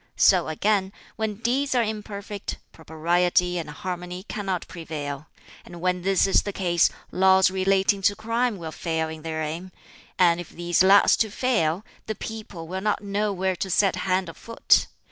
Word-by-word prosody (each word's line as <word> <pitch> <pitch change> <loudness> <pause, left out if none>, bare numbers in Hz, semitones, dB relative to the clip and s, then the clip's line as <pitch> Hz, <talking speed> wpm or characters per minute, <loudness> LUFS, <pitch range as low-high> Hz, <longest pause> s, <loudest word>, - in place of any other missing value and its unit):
So, 185 -4 +5
again, 195 +4 0 0.2
when 220 -1 -2
deeds 255 +5 0
are 240 - +4
imperfect, 205 -2 -5
propriety 175 +2 0
and 160 - -6
harmony 180 +3 -6
cannot 195 -4 -4
prevail, 150 -4 -6 0.4
and 175 -1 -11
when 180 +1 0
this 190 0 +3
is 195 - +3
the 205 - -4
case 175 -3 +2 0.2
laws 190 0 +4
relating 195 +1 +2
to 205 - -7
crime 230 +1 -1
will 165 -3 -6
fail 160 -1 -2
in 160 0 -8
their 160 0 -3
aim; 165 +5 -5 0.5
and 175 -2 +4
if 175 - -7
these 175 0 0
last 195 +2 +6
so 220 - +1
fail, 210 -6 0 0.2
the 220 - -3
people 205 -8 -7
will 185 +2 -4
not 210 0 -1
know 205 +1 -1
where 190 -1 -1
to 190 - -3
set 195 +1 +2
hand 185 -1 0
or 165 - -7
foot. 230 +6 +2
185 Hz, 170 wpm, -25 LUFS, 170-205 Hz, 0.5 s, last